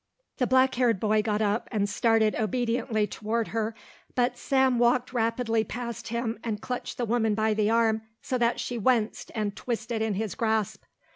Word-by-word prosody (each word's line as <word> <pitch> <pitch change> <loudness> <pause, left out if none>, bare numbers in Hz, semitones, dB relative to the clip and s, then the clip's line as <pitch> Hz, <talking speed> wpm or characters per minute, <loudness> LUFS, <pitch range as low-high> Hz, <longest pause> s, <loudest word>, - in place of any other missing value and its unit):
The 250 - +1
black 260 +1 +4
haired 240 -5 +2
boy 215 +1 +2
got 210 0 0
up 210 +2 0
and 205 -3 +1
started 220 +1 +2
obediently 230 0 0
toward 220 +2 -2
her, 225 0 -2 0.4
but 245 0 +2
Sam 265 -1 +2
walked 245 +1 +2
rapidly 230 -1 +1
past 235 0 -6
him 235 0 -2
and 220 -3 -2
clutched 250 +3 -5
the 245 - -1
woman 225 -2 +1
by 220 0 +2
the 210 0 +1
arm 225 -1 +2 0.2
so 255 - -2
that 235 0 +2
she 240 -1 -3
winced 225 -1 +1
and 210 -2 -2
twisted 235 -1 -3
in 220 -2 0
his 215 0 -2
grasp. 220 -3 -1
225 Hz, 175 wpm, -27 LUFS, 215-245 Hz, 0.4 s, black